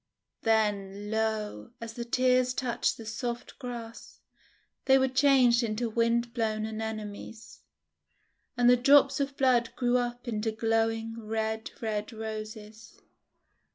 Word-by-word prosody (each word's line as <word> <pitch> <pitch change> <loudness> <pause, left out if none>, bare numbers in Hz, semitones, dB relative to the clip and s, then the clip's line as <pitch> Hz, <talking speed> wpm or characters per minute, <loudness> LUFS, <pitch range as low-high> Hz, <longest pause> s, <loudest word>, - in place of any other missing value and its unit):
Then, 205 -2 0
lo! 215 - -2
as 230 -1 -7
the 235 - -5
tears 250 +1 +2
touched 245 -3 0
the 225 - -9
soft 235 +2 -5
grass, 235 -3 -8 0.7
they 265 0 +6
were 265 0 +3
changed 260 -2 +4
into 230 0 -2
wind 235 +1 +1
blown 215 -2 -1
Anemones! 220 0 -7 1.0
And 245 0 +4
the 250 0 +7
drops 275 +2 +5
of 275 0 -2
blood 250 -3 +3
grew 245 0 +2
up 245 +1 -4
into 220 -1 -1
glowing 225 0 0
red, 220 0 -3
red 210 0 -2
Roses! 220 0 -8
225 Hz, 120 wpm, -29 LUFS, 220-245 Hz, 1.0 s, the